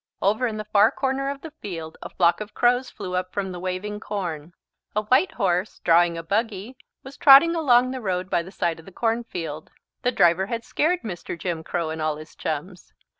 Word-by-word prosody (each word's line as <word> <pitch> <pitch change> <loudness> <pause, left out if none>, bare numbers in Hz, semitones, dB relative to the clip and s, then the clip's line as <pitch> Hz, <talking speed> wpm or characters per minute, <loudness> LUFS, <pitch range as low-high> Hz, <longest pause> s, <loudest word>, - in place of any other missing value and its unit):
Over 215 +6 +1
in 220 -2 -4
the 215 - -5
far 210 +1 +5
corner 270 0 -1
of 280 0 -5
the 320 -2 -9
field 165 -5 -6
a - - -7
flock 175 +2 +2
of 210 0 -8
crows 245 +1 +2
flew 190 -4 -7
up 185 0 -2
from 195 -2 -3
the 180 - -6
waving 185 +3 -4
corn. 175 -6 -5 0.4
A 210 - +1
white 255 - +3
horse, 185 -2 0
drawing 170 0 +4
a 165 - -5
buggy, 215 +4 -2 0.3
was 265 +1 -11
trotting 285 +4 +8
along 255 -6 +3
the 260 -1 -5
road 185 -3 -2
by 175 - +1
the 180 +3 -10
side 170 -4 -1
of 160 - -14
the - - -10
cornfield. 180 -9 -3 0.3
The 250 - +1
driver 175 -3 +3
had 230 +1 -3
scared 355 +4 0
Mr. 175 -4 -6
Jim 165 -1 -3
Crow 165 -1 -2
and 160 0 -5
all 155 -1 0
his 155 +1 -12
chums. 165 +4 -5
195 Hz, 210 wpm, -24 LUFS, 175-240 Hz, 0.4 s, trotting